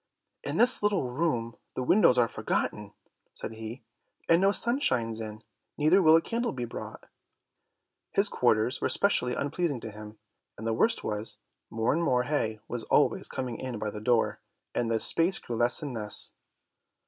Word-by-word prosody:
"In - - -3
this 250 +1 +5
little 200 -12 0
room 125 -5 -2 0.2
the 130 - -2
windows 125 -3 +4
are 120 -1 +4
forgotten," - - -3 0.4
said - - -4
he, 110 +3 -8 0.4
"and 165 +2 +4
no 195 +1 +4
sun 235 +5 +2
shines 115 - 0
in, 110 0 -8 0.3
neither 155 +6 +4
will 160 -2 +6
a 165 - +3
candle 235 +1 -2
be 125 -2 -4
brought." - - -9 1.0
His 200 +1 +3
quarters 120 - +1
were - - +1
especially 125 -11 +2
unpleasing 145 -1 -2
to 110 - -7
him, 105 +1 -11 0.4
and 110 - -8
the 115 - 0
worst 225 - +1
was, 105 +1 -1 0.3
more 115 +2 0
and 165 - 0
more 125 -7 +2
hay 115 -6 -2
was 120 - -4
always - - +2
coming 125 -3 -4
in 130 -3 -5
by 105 0 -3
the 105 - -8
door, 115 0 +1 0.3
and 120 -1 -1
the 115 -1 +1
space 170 +9 +2
grew 120 - -6
less 120 +6 +3
and 140 -3 -5
less. 105 -3 +2
125 Hz, 175 wpm, -28 LUFS, 115-165 Hz, 1.0 s, will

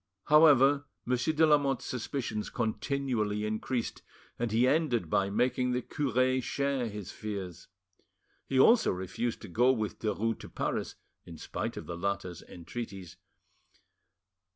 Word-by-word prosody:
However, 145 -2 +6 0.2
Monsieur 125 +5 +1
de 160 +1 +5
Lamotte's 140 -4 +2
suspicions 120 -3 -3
continually 110 -2 -1
increased 115 +3 -3 0.4
and 120 -2 -1
he 120 +3 +3
ended 130 - +1
by 100 0 +2
making 125 +4 +1
the 125 0 -1
cure 130 -3 +1
share 140 -2 -1
his 105 -2 -7
fears. 100 -6 -6 0.8
He 130 - +1
also 225 - +6
refused 95 +7 -3
to - - -7
go 120 +8 +3
with 110 -5 -2
Derues 110 +1 -1
to - - -10
Paris, - - -3 0.3
in 85 -2 -11
spite - - -4
of - - -6
the 85 - -6
latter's 90 -2 -3
entreaties. 95 -1 -8
120 Hz, 130 wpm, -30 LUFS, 105-135 Hz, 0.8 s, However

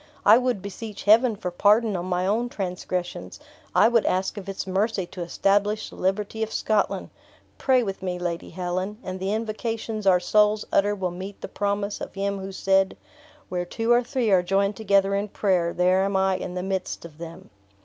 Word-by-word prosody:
I 220 +3 +8
would 250 -6 -1
beseech 205 +1 -7
Heaven 225 +2 +5
for 190 -3 -4
pardon 210 +4 +3
on 175 0 -3
my 180 0 0
own 225 +5 0
transgressions; 180 -3 -4 0.4
I - - +6
would 230 -1 +3
ask 185 +1 0
of 195 -2 -7
its 195 - -4
mercy 195 +1 0
to 180 +1 -9
establish 205 +4 +1
the - - -12
liberty 205 +3 -1
of 220 0 -1
Scotland. 215 -1 0 0.5
Pray 260 -2 +3
with 195 -4 -4
me, 180 -1 -2
Lady 175 -1 -4
Helen, 185 +3 -3
and 185 0 -5
the 190 +1 -2
invocations 220 -1 -3
our 180 -2 +6
souls 210 +3 +3
utter 205 +1 +3
will 185 -3 -2
meet 190 +3 -8
the - - -5
promise 200 0 -2
of - - -7
Him 200 0 -2
who 195 0 -6
said: 190 0 +1 0.5
'Where 180 -1 -2
two 225 +6 -2
or 240 0 +6
three 245 -3 -1
are 185 -2 +5
joined 195 +3 +1
together 200 -2 +2
in 200 +1 0
prayer, 185 -4 +1
there 185 +2 +3
am 200 0 -1
I 190 0 +2
in 180 -1 -6
the 180 - -3
midst 190 -2 -3
of 160 -2 -13
them.'" 165 0 -10
195 Hz, 195 wpm, -25 LUFS, 185-215 Hz, 0.5 s, I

